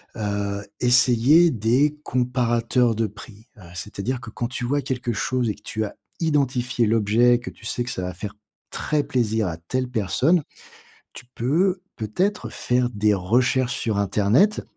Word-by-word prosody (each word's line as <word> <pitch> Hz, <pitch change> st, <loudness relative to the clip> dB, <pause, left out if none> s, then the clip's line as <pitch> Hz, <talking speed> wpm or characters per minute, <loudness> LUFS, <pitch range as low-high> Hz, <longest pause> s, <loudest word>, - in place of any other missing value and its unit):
heu, 100 Hz, -2 st, -2 dB, 0.2 s
essayer 125 Hz, +7 st, +5 dB
des 130 Hz, +6 st, +1 dB
comparateurs 120 Hz, -1 st, +1 dB
de 115 Hz, +1 st, 0 dB
prix. 105 Hz, +1 st, -13 dB
Heu, 105 Hz, -, -15 dB
c'est-à-dire 105 Hz, +7 st, -4 dB
que 110 Hz, -, -9 dB
quand 120 Hz, +2 st, -3 dB
tu 125 Hz, 0 st, -4 dB
vois 145 Hz, +3 st, 0 dB
quelque 125 Hz, -3 st, -3 dB
chose 120 Hz, +2 st, -1 dB
et 105 Hz, -, -2 dB
que -, -, -22 dB
tu 110 Hz, -, -3 dB
as -, -, -7 dB, 0.3 s
identifié 130 Hz, -6 st, +1 dB
l'objet, 115 Hz, +3 st, +3 dB
que 120 Hz, -, -7 dB
tu 115 Hz, -, -16 dB
sais 120 Hz, -, -1 dB
que 120 Hz, -, -4 dB
ça 90 Hz, -, -4 dB
va 90 Hz, 0 st, -4 dB
faire 105 Hz, +3 st, -7 dB, 0.4 s
très 150 Hz, -1 st, 0 dB
plaisir 110 Hz, -5 st, 0 dB
à 85 Hz, -2 st, -4 dB
telle 130 Hz, +10 st, -3 dB
personne. 130 Hz, -, +1 dB, 0.7 s
Tu -, -, -10 dB
peux 180 Hz, +10 st, +1 dB
peut-être 180 Hz, -, -2 dB
faire 125 Hz, 0 st, 0 dB
des 105 Hz, -2 st, +1 dB
recherches 120 Hz, +6 st, +1 dB
sur 110 Hz, -3 st, -1 dB
internet 105 Hz, -, +2 dB
120 Hz, 165 wpm, -23 LUFS, 105-130 Hz, 0.7 s, essayer